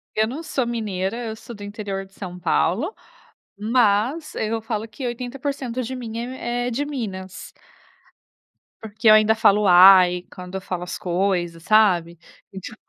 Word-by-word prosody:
Eu 220 0 +2
não 270 +8 -6
sou 270 -6 -2
mineira, 215 -4 -3
eu 220 - -5
sou 230 +1 -11
do 205 - -10
interior 205 -1 -5
de 195 - -24
São 180 -2 -8
Paulo, 195 - 0 0.6
mas 230 +7 +1
eu 225 +1 -2
falo 220 0 -4
que 245 +4 -8
80% 255 +1 -4
de 260 +3 -5
mim 230 -3 -6
é 230 - -3
m 255 +2 -7 0.3
é 245 - -2
de 275 +5 -1
Minas. 195 -10 -6 1.3
Porque 220 0 -3
eu 215 - +9
ainda 215 +1 +5
falo 210 -1 +4
"Uai"' 180 -1 +7
quando 180 +1 -9
eu 190 - -3
falo 180 -2 -5
as 180 0 -5
coisas, 175 -2 -1
sabe. 180 -6 +3 0.4
E 190 - -6
tipo 215 +3 -10
215 Hz, 170 wpm, -22 LUFS, 190-235 Hz, 1.3 s, eu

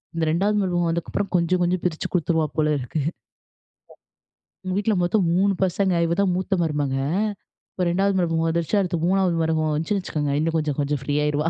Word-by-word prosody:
இந்த 165 - -1
2வது 200 +6 +1
மருமக 175 -2 0
வந்ததுக்கப்புறம் 170 +4 -2
கொஞ்ச 170 0 -1
கொஞ்சம் 175 0 0
பிரிச்சு 160 -3 -1
குடுத்துருவா 165 -3 +1
போல 155 -1 +2
இருக்கு. 130 +5 -4 1.6
அவங்க 185 -1 -3
வீட்ல 215 +2 +1
மொத்தம் 185 +2 +2
3 200 +1 +3
பசங்க. 190 +1 +1
இவ 165 - 0
தான் 195 -2 +2
மூத்த 185 +2 -1
மருமக. 150 -4 -1 0.8
இப்ப 180 - -2
2வது 195 +3 +1
மரும 165 -2 +1
வந்துருச்சு. 170 +5 0
அடுத்து 175 -3 -1
3வது 185 -2 +2
மருமவ 160 -1 0
வந்துச்சுன்னு 165 +7 -1
வச்சுக்குங்க, 145 -5 -2
இன்னும் 165 +1 0
கொஞ்ச 155 -1 0
கொஞ்சம் 145 -1 -1
ஃப்ரீயாருவா. 150 +2 0
170 Hz, 165 wpm, -23 LUFS, 155-185 Hz, 1.6 s, 3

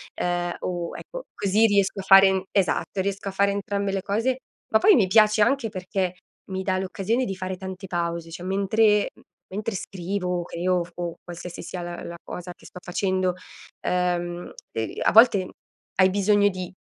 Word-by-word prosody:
ehm, 175 0 -1
o 175 -2 -4
ecco - - -8
così 205 +3 +3
riesco 200 -1 +2
a - - -10
fare 195 -1 +6
esatto, 195 0 0
riesco 200 0 -3
a - - -5
fare 200 +1 +2
entrambe 200 0 -2
le 195 -1 -1
cose. 230 +6 0 0.4
Ma 220 - +6
poi 425 - +6
mi 200 -7 +4
piace 215 +1 +5
anche 260 0 +2
perché 185 -1 -2 0.4
mi 190 0 -2
dà 185 -1 0
l'occasione 200 +6 -1
di 195 - -3
fare 185 0 -4
tante 190 0 -7
pause, 170 -1 -3
cioè, 175 +2 -8
mentre 205 +2 +2
uhm, - - -20 0.3
mentre 210 +1 -3
scrivo, 180 -1 -3
o - - -5
creo, 180 +2 -1
o - - -1
f 175 - -14
o 175 -1 -4
qualsiasi 175 0 -8
sia 180 - -6
la 175 0 -6
la 170 0 -7
cosa 180 0 -7
che - - -20
sto 180 - -11
facendo, 185 0 0 0.5
ehm, 175 -1 -1 0.2
e 110 -1 -4
a - - +4
volte 210 -5 +6 0.5
hai 190 0 +5
bisogno 205 +1 +3
di 185 -2 -6
190 Hz, 185 wpm, -25 LUFS, 180-200 Hz, 0.5 s, fare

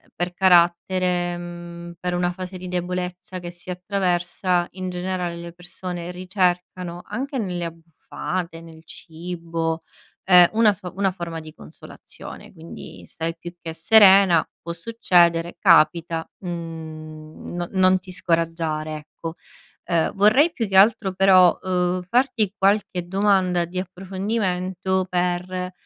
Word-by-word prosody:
per 175 0 -3
carattere, 175 0 +3
mhmm, 175 0 -8
per 180 0 -2
una 175 0 0
fase 185 +1 -7
di 180 0 -8
debolezza 180 +1 -4
che 175 0 -7
si 180 +1 -13
attraversa 180 -1 0
in 185 0 -5
generale, 180 -1 -3
le 170 0 -8
persone 175 0 -7
ricercano 180 -1 -2
anche 270 +1 -4
nelle 180 -6 -2
abbuffate, 165 +1 -6
nel 160 -1 -14
cibo, 165 -1 -5 0.4
ehm, 180 -2 +7
una 220 -1 +5
so 185 -3 -8
una 195 -1 +1
forma 170 -3 -6
di 155 0 -12
consolazione 155 - -12
quindi, 165 -2 -11
stai 165 +1 -4
più 175 +1 -9
che 165 -1 -6
serena, 190 -2 +6
può 170 - -6
succedere 170 -4 +2
capita, 165 -2 +3
mhmm, 160 -3 -8
no 175 0 -3
non 185 -1 +4
ti 185 0 -12
scoraggiare, 165 -3 -1
ecco. 155 +2 -8 0.5
Ehm, 170 -1 0
vorrei 255 +12 +4
più 225 -5 -3
che 190 - +2
altro 205 -1 +5
però, 185 -2 +5
ehm, 180 -1 0
farti 235 0 +1
qualche 195 -3 +1
domanda 190 -3 +2
di 180 +2 -5
approfondimento 190 0 -2
per, 180 +1 -1
180 Hz, 130 wpm, -23 LUFS, 170-185 Hz, 0.5 s, ehm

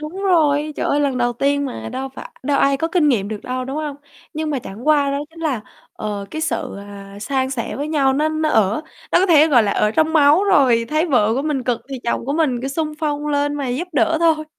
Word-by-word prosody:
Đúng 325 +6 -6
rồi, 305 -5 +2
trời - - -1
ơi, 290 - +1
lần 275 -3 0
đầu 245 0 +1
tiên 280 +3 0
mà, 110 - -6
đâu 265 - -4
phải - - -8
đâu 280 +1 +1
ai 275 0 +3
có 325 +4 -1
kinh 330 -3 +2
nghiệm 210 -7 +1
được 215 -1 -5
đâu, 255 0 -3
đúng 270 +3 -5
hông? 300 -2 -4 0.4
Nhưng 310 0 -2
mà 285 - -1
chẳng 225 +1 -9
qua 285 -2 +4
đó 280 - -1
chính 330 0 -14
là, 285 -9 -1 0.3
ờ, 205 -2 -5
cái 315 - -4
sự, 235 -9 -2
à, 200 0 -10
san 260 +3 -1
sẻ 250 -4 -4
với 290 +2 -3
nhau 280 -4 +2
nó 300 +3 +1
nó 310 0 -1
ở 215 +2 +2 0.3
nó - - +6
có 380 - +3
thể, 315 -2 +6
gọi 250 -6 +5
là, 205 -2 0
ở 210 - +1
trong 315 +7 +1
máu 310 +4 +5
rồi. 265 -12 +4
Thấy 310 +3 +1
vợ 225 -8 +2
của 270 - -1
mình 295 -4 -1
cực 245 -2 -1
thì 265 -2 -5
chồng 235 - -1
của 280 - -1
mình 290 -7 +1
cứ 270 - -2
xung 305 +2 -2
phong 295 -1 -2
lên 290 0 0
mà 280 -3 -3
giúp 280 +9 -3
đỡ 290 +4 +2
thôi. 315 -2 +3
285 Hz, 260 wpm, -20 LUFS, 245-310 Hz, 0.4 s, nó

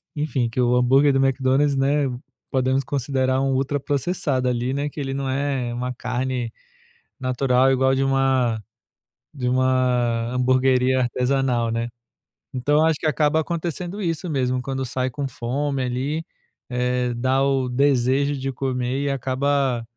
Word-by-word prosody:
enfim, 135 -5 -1
que 115 - -4
o 125 0 +3
hambúrguer 135 +3 +4
do 135 0 +3
McDonald's, 135 +2 +2
né, 140 +2 +2 0.5
podemos 130 +1 +1
considerar 130 0 0
um 135 - +1
ultra 140 +2 0
processado 140 -2 -1
ali, 125 +2 -1
né, 145 +1 -1
que 145 - -9
ele 135 -1 -3
não 135 -1 -2
é 135 -3 -1
uma 125 +1 -3
carne 125 -1 -3 0.7
natural 130 0 +2
igual 130 0 +3
de 135 - +1
uma 130 -4 +1 0.7
de 125 -3 -3
uma 125 -2 +1
hamburgueria 130 0 +3
artesanal, 125 -1 0
né, 115 +1 -1 0.7
então 145 +5 +2
acho 160 -2 +2
que - - -4
acaba 150 0 +2
acontecendo 170 +4 -4
isso 170 0 -2
mesmo, 130 -4 0
quando 135 0 -3
sai 130 +1 -2
com 140 +2 -4
fome 135 +3 -2
ali, 135 +6 -2 0.4
eh, 125 0 -1
dá 130 +3 +1
o 135 -2 +1
desejo 135 +2 +2
de 135 0 -3
comer 130 +1 -2
e 140 - 0
acaba 135 -1 0
130 Hz, 145 wpm, -23 LUFS, 125-140 Hz, 0.7 s, hambúrguer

